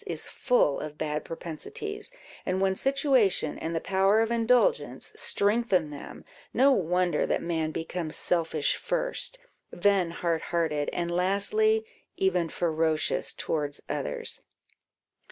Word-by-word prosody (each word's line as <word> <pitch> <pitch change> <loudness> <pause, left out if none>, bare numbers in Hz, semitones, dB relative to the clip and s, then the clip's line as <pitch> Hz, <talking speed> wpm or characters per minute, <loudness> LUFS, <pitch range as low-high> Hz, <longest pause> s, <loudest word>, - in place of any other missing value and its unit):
is - - -3
full 245 - +2
of 150 0 -7
bad 150 -1 -2
propensities; 415 - -5 0.3
and 185 +1 -1
when 190 0 +2
situation 270 -5 +2
and 165 +1 -3
the - - +1
power 195 +4 +3
of 225 +1 +1
indulgence 245 - +1
strengthen 205 - +1
them, 145 - -9 0.3
no 270 +4 +6
wonder 180 - +1
that - - +1
man 160 -2 -1
becomes 165 0 -4
selfish 160 -4 0
first, - - -2 0.3
then 190 -1 +2
hard 165 -1 -1
hearted, 160 -4 -1
and 170 0 -2
lastly, 205 - +3 0.3
even 180 -3 +1
ferocious 160 -2 +1
towards 145 -2 -2
others. - - -3
180 Hz, 120 wpm, -28 LUFS, 160-235 Hz, 0.3 s, no